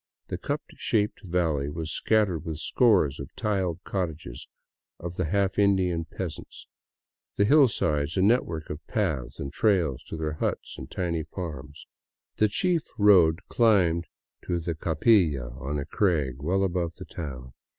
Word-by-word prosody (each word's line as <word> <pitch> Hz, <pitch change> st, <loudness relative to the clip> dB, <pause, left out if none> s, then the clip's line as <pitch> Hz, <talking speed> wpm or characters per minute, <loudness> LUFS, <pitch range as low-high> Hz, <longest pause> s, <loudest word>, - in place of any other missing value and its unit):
The -, -, -3 dB
cup -, -, -3 dB
shaped 105 Hz, -2 st, 0 dB
valley 85 Hz, -7 st, 0 dB
was 80 Hz, +1 st, -4 dB
scattered 100 Hz, -7 st, +1 dB
with 80 Hz, -3 st, -4 dB
scores 90 Hz, -, +3 dB
of 70 Hz, +1 st, -8 dB
tiled 95 Hz, -5 st, -1 dB
cottages 80 Hz, -10 st, -4 dB, 0.5 s
of 85 Hz, +1 st, -6 dB
the 90 Hz, -, -1 dB
half 100 Hz, +4 st, 0 dB
Indian 95 Hz, -5 st, +2 dB
peasants, 85 Hz, +1 st, -7 dB, 0.7 s
the 100 Hz, -, +3 dB
hillsides 85 Hz, -, +3 dB
a 95 Hz, -, +3 dB
network 95 Hz, -8 st, +1 dB
of 75 Hz, +1 st, -7 dB
paths 75 Hz, -, -2 dB
and 70 Hz, -2 st, -5 dB
trails 90 Hz, -, +2 dB
to -, -, -6 dB
their 80 Hz, -1 st, -2 dB
huts 75 Hz, -, -3 dB
and 65 Hz, -, -9 dB
tiny 85 Hz, -3 st, -2 dB
farms. 75 Hz, -4 st, -7 dB, 0.5 s
The 110 Hz, -, +4 dB
chief 170 Hz, -, +1 dB, 0.2 s
road 90 Hz, -5 st, +5 dB
climbed 90 Hz, -8 st, +3 dB, 0.4 s
to 85 Hz, -1 st, -1 dB
the 85 Hz, 0 st, -3 dB
Capilla 80 Hz, -, +2 dB
on 70 Hz, +4 st, -3 dB
a 70 Hz, -, -3 dB
crag 75 Hz, -, 0 dB
well 95 Hz, +6 st, +1 dB
above 85 Hz, -3 st, -1 dB
the -, -, -9 dB
town. 65 Hz, -6 st, -7 dB
85 Hz, 150 wpm, -27 LUFS, 75-100 Hz, 0.7 s, road